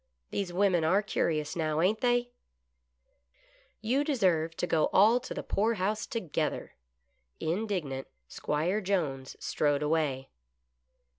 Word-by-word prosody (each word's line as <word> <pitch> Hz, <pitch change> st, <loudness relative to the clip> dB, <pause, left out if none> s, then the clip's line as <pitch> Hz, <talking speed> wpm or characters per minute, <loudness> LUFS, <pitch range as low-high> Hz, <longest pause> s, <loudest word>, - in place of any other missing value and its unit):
These 195 Hz, -3 st, -2 dB
women 180 Hz, -2 st, +2 dB
are 190 Hz, +6 st, +3 dB
curious 155 Hz, -7 st, -1 dB
now, 155 Hz, -2 st, 0 dB
ain't 200 Hz, +6 st, +2 dB
they 245 Hz, 0 st, +2 dB, 0.5 s
" 60 Hz, 0 st, -47 dB
" 60 Hz, -, -34 dB
You 250 Hz, +6 st, +1 dB
deserve 180 Hz, -, +1 dB
to -, -, 0 dB
go 160 Hz, -3 st, +2 dB
all 220 Hz, +5 st, +5 dB
to 250 Hz, -, -11 dB
the -, -, -4 dB
poorhouse 210 Hz, 0 st, 0 dB
together." 190 Hz, -10 st, -3 dB, 0.7 s
Indignant 165 Hz, -7 st, -2 dB, 0.2 s
'Squire 170 Hz, -, -1 dB
Jones 155 Hz, -9 st, -2 dB
strode 145 Hz, -1 st, 0 dB
away. 150 Hz, -4 st, 0 dB
175 Hz, 125 wpm, -30 LUFS, 150-210 Hz, 0.7 s, all